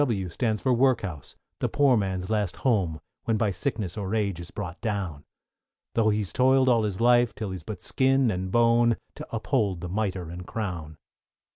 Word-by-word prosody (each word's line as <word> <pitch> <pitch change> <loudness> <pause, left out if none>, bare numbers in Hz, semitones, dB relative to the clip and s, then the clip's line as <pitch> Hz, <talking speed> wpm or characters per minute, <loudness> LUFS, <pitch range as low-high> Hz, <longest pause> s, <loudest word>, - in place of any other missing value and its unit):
=W= 105 -10 0
stands 110 +4 -1
for 130 - +3
Workhouse, 115 - 0 0.2
the - - 0
poor 140 -3 +4
man's 95 -3 -1
last 105 -4 0
home, 95 -11 +2 0.3
When 115 -1 +1
by 105 -1 +1
sickness 110 -4 -3
or 100 +2 -2
age 100 -5 0
is 85 0 -8
brought 95 -3 -6
down, 95 -10 -3 0.7
Tho' 110 -2 +3
he's 105 -3 -1
toil'd 130 +1 +4
all 115 -3 +4
his 100 -3 -3
life 120 0 +4
till 105 -3 -4
he's 95 -2 -5
but 100 +4 -8
skin 135 -2 +2
and 95 -1 -3
bone, 115 +1 +4 0.2
To - - -9
uphold 110 - 0
the 90 - -5
mitre 95 -3 -2
and 90 +1 -8
crown. 85 -8 -4
105 Hz, 180 wpm, -26 LUFS, 95-120 Hz, 0.7 s, poor